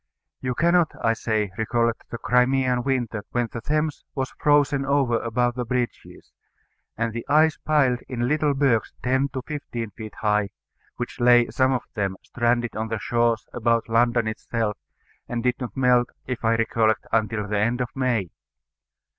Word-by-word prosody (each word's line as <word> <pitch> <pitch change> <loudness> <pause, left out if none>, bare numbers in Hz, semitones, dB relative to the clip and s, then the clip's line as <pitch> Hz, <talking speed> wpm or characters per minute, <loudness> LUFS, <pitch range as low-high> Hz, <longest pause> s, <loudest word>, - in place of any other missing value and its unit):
You 125 -1 -2
cannot, 170 +1 +3
I 115 - +3
say, 110 -3 -1
recollect 115 +1 0
the 115 - -5
Crimean 125 +1 +2
Winter, 120 -5 -1
when 120 -2 0
the 115 - -6
Thames 150 +4 -1
was 130 -2 -3
frozen 145 -2 +3
over 135 -4 +2
above 120 +1 0
the 125 0 -3
bridges, 120 0 -4 0.7
and 115 0 -1
the 115 - -4
ice 155 +1 +4
piled 135 -5 +2
in 120 -1 -1
little 150 0 +1
bergs 135 -5 +1
ten 130 +2 +1
to 130 -2 -4
fifteen 120 -7 -5
feet 110 +1 -9
high, 105 -2 +1 0.5
which 120 +1 -6
lay, 120 0 +5
some 130 0 +2
of 130 -1 0
them, 100 -3 -2
stranded 120 0 0
on 110 +1 -2
the 110 0 -2
shores, 115 0 +1
about 115 -1 +1
London 120 0 +2
itself, 110 -1 -2 0.5
and 120 -1 -2
did 125 0 +1
not 125 -4 -6
melt, 125 -2 +3 0.2
if 125 -2 -4
I 115 0 +3
recollect, 110 -1 +1
until 110 -1 0
the 105 0 0
end 115 +4 +1
of 125 -1 -1
May. 120 -9 0
120 Hz, 165 wpm, -24 LUFS, 115-130 Hz, 0.7 s, lay